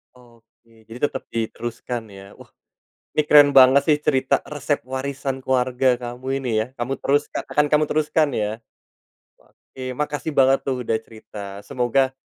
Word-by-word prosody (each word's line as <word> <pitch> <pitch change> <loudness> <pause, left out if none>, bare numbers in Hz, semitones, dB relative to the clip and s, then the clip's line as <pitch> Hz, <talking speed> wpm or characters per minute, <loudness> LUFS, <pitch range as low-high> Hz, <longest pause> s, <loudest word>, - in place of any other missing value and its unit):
Oke. 115 -2 -23
Jadi, 115 - -8
tetep 135 - -4
diteruskan, 115 +1 -4
ya. 100 0 -13
Wah, - - -16 0.7
ini 150 - +3
keren 145 -1 +7
banget 135 +1 +7
sih 150 - +5
cerita 130 -3 +1
resep 145 0 -2
warisan 135 0 -4
keluarga 130 -1 +1
kamu 125 +1 -8
ini 130 -3 -4
ya, - - -5
kamu 125 +3 -2
teruskan 145 +1 0
akan 150 0 +3
kamu 150 +1 +3
teruskan, 155 0 +2
ya. 105 -1 -1 0.9
Oke, 130 -1 -10
makasih 145 +2 -3
banget 135 0 +4
tuh 130 -2 -2
udah 110 - +1
cerita, 110 -1 -13 0.3
semoga 130 +2 +1
130 Hz, 145 wpm, -22 LUFS, 120-140 Hz, 0.9 s, keren